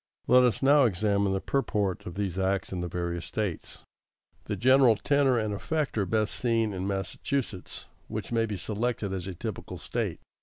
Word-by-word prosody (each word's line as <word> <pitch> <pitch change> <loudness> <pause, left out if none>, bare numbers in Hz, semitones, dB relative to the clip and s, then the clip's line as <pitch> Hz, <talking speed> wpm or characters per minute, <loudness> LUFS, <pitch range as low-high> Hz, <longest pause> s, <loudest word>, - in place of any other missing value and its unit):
= - - -46
Let 125 +1 +7
us 125 +1 +2
now 140 0 +6
examine 100 -1 +1
the 95 - 0
purport 105 -7 -1
of 90 - -7
these 95 -2 -2
acts 95 0 0
in 90 - -2
the 90 - -2
various 85 0 -3
States. 100 -7 -4 0.6
The - - -2
general 130 -2 +5
tenor 140 +2 +2
and 110 -2 -1
effect 150 +8 -2
are 100 -3 0
best 110 +1 0
seen 115 -3 +1
in 95 0 -3
Massachusetts, 100 +2 -3 0.2
which - - -5
may 115 -1 +2
be 105 -2 -3
selected 105 +1 -2
as 95 -1 -4
a 95 - -5
typical - - -6
State. - - -3
105 Hz, 185 wpm, -28 LUFS, 95-125 Hz, 0.6 s, Let